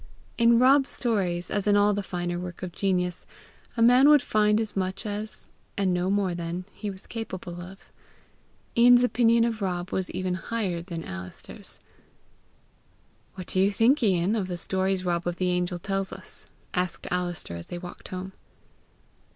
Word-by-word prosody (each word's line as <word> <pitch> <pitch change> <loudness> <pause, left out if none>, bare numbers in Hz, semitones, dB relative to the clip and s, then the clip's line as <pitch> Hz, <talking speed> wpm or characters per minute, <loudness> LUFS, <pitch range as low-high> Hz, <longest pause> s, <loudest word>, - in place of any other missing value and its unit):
In 235 0 +6
Rob's 270 +3 +5
stories, 185 -8 -1
as 205 0 -1
in 205 0 +5
all 205 0 +4
the 205 - -1
finer 175 -2 -3
work 180 0 -7
of 180 - -4
genius, 180 -1 -1 0.5
a 230 - +4
man 250 +4 +7
would 295 -4 +6
find 210 0 +3
as 220 -2 -3
much 190 +1 -2
as, 210 +1 -4 0.3
and 190 -2 +2
no 180 +1 0
more 195 -2 +1
than, 170 +1 -4
he 210 - -5
was 190 -1 -9
capable 185 -6 -6
of. 185 +2 -12 0.8
Ian's 245 +1 +7
opinion 235 -2 +4
of 230 -2 -1
Rob 180 -2 -2
was 190 -1 -1
even 185 0 -2
higher 185 -1 -2
than 170 -2 -6
Alister's. 90 0 -9 1.6
"What 185 -1 -7
do 185 - -1
you 195 +2 +4
think, 235 +8 +3
Ian, 190 -1 +2
of 200 -4 -1
the 180 -1 -4
stories 190 +1 0
Rob 175 0 0
of 175 - -1
the 180 0 0
Angels 180 0 -1
tells?" 195 0 -4 0.3
asked 180 -1 -2
Alister, 175 - -2
as 85 - -8
they 175 - -6
walked 175 0 -9
home. 185 +1 -6
190 Hz, 165 wpm, -26 LUFS, 180-215 Hz, 1.6 s, man